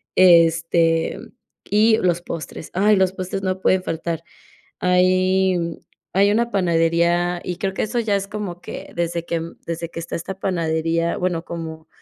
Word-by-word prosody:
este, 165 -2 +4
mm, - - -11 0.4
y 220 +2 +4
los 175 -1 +1
postres. 155 -1 -7
Ay, 205 +3 +4
los 190 0 +2
postres 190 +1 -4
no 185 0 -1
pueden 185 -1 +2
faltar. 165 0 -3 0.6
Hay 185 +1 +3 0.6
hay 200 +2 +4
una 235 +2 +1
panadería 170 -1 +2
y 180 - -3
creo 190 -1 -2
que - - -1
eso 230 +3 -3
ya 215 -3 +1
es 195 0 -5
como 200 -4 -5
que - - -8
desde 170 0 -2
que 165 -1 -2 0.2
desde 170 0 -4
que 170 - -7
está 170 - -5
esta 190 +3 -6
panadería, 165 -2 0
bueno, 180 -3 -1
como, 160 -1 -7
175 Hz, 160 wpm, -21 LUFS, 165-190 Hz, 0.6 s, este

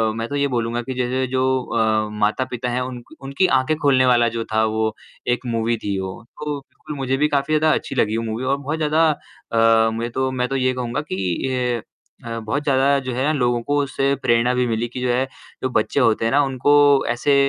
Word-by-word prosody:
मैं 115 0 -3
तो 145 - -3
ये 140 0 +2
बोलूँगा 120 -2 -1
कि 130 +2 -5
जैसे 130 +1 -1
जो 130 +1 0 0.2
अ, 110 -2 0
माता-पिता 125 +3 -1
हैं 125 +1 -1
उनक 125 -1 -7
उनकी 140 +7 +1
ऑंखें 130 +5 0
खोलने 130 -3 +4
वाला 120 -2 +4
जो 115 0 -3
था 110 0 +3
वो 110 0 -1 0.3
एक 125 +1 0
मूवी 115 -1 0
थी 100 -1 -1
वो, 95 +4 -6 0.2
तो 145 0 -6
मुझे 135 -1 -1
भी 150 +2 +3
काफ़ी 145 +1 0
ज़्यादा 155 +1 +3
अच्छी - - -4
लगी 110 -3 +1
वो 115 - -2
मूवी 110 +2 -3
और 135 +2 +1
बहुत 145 +3 -3
ज़्यादा 155 +1 +3 0.4
अ, 115 0 +4
मुझे 115 +1 -3
तो 130 +2 -1
मैं 125 -1 -1
तो 135 - -3
ये 130 -1 +1
कहूँगा 125 +2 -3
कि 120 +6 -1 0.4
अ, 115 0 -4
बहुत 115 +6 -2
ज़्यादा 140 0 +3
जो 130 -1 -5
है 130 +2 -1
ना 150 - +2
लोगों 120 -4 +1
को 145 +4 0
उससे 135 0 0
प्रेरणा 120 0 +2
भी 125 0 +1
मिली 115 0 -1
कि 125 +2 -7
जो 125 - 0
है 125 +2 +1 0.4
जो 130 - +1
बच्चे 110 - -1
होते 115 -3 +2
हैं 115 - +1
ना 145 - +4
उनको 135 +1 +1 0.4
ऐसे 120 +4 +2
125 Hz, 220 wpm, -21 LUFS, 115-135 Hz, 0.4 s, खोलने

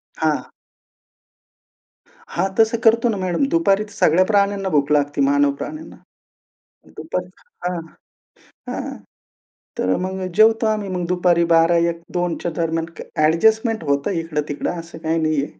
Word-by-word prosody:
हां. 155 -2 -1 1.9
हां, 190 +3 +1
तसं 225 +1 +4
करतो 230 +1 +4
ना 210 - -1
मॅडम. 185 +5 -1
दुपारीच 215 -11 +2
सगळ्या 175 +4 +4
प्राण्यांना 200 -1 +1
भूक 145 -2 +1
लागते 145 -1 +1
मानव 140 +1 +3
प्राण्यांना. 310 +1 -7 1.0
दुपारीच 180 - -5 0.3
हां, 180 -1 -2 0.9
हां. - - -5 0.8
तर 95 0 +1
मग 190 0 -4 0.2
जेवतो 220 +1 +5
आम्ही. 210 -2 -1
मग 180 -1 -3
दुपारी 175 -1 +2
12:00, 165 +1 +5
1:00, 170 0 0
2:00च्या 175 -1 -1
दरम्यान. 165 -1 -1 0.3
अ‍ॅडजस्टमेंट 220 +6 +2
होतं 140 +2 0
इकडं-तिकडं 150 -3 -3
असं 165 -1 -11
काही 160 +1 -1
नाहीये. 155 -2 +1
175 Hz, 125 wpm, -20 LUFS, 160-205 Hz, 1.9 s, जेवतो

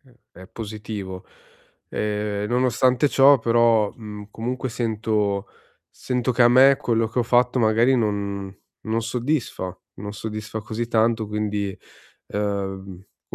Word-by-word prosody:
è 120 -7 -23
è 95 - -11
positivo. 105 -4 -7 0.6
Ehm, 105 -1 -2
nonostante 125 +2 +2
ciò 140 +1 +6
però, 115 -2 +3
mhmm, 105 -2 -9
comunque 125 +4 -3
sento 110 -3 -1 0.4
sento 125 0 -2
che 120 - +3
a 120 - +7
me 135 +3 +7
quello 115 -3 0
che 115 +3 -1
ho - - +2
fatto 125 +2 +2
magari 115 +3 +4
non 100 -3 -2 0.3
non 110 +1 0
soddisfa, 120 - -2 0.2
non 105 +1 -7
soddisfa 110 +1 -5
così 110 +2 -4
tanto 115 -1 +1
quindi, 105 -1 -2 0.6
ehm, 100 -2 -3 0.5
v - - -7
110 Hz, 130 wpm, -23 LUFS, 105-120 Hz, 0.6 s, a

